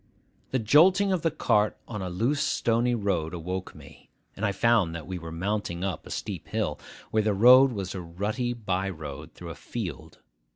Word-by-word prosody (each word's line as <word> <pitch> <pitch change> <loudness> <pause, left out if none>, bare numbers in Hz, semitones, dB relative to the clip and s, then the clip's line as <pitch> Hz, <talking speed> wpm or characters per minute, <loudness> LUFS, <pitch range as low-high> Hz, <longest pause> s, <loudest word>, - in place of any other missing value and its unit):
The 130 - 0
jolting 180 - +5
of 185 -3 +1
the 165 - +2
cart 105 -9 +1
on 105 -3 -5
a 95 - -3
loose 120 +11 0
stony 120 +1 +1
road 90 -6 -1
awoke 90 +2 -5
me; 75 -1 -15 0.3
and 100 - -7
I 105 - +2
found 100 -4 +2
that 85 - -6
we 90 -1 -5
were 80 -1 -8
mounting 90 0 -2
a 95 -5 -2
steep - - -5
hill, - - -2 0.3
where 110 - +3
the 105 -1 +1
road 125 +5 +7
was 100 -5 -4
a 95 - -5
rutty 105 +9 -2
by 95 -4 -2
road 75 -3 -8
through 85 -1 -8
a - - -6
field. 95 - -7
100 Hz, 190 wpm, -27 LUFS, 85-120 Hz, 0.3 s, road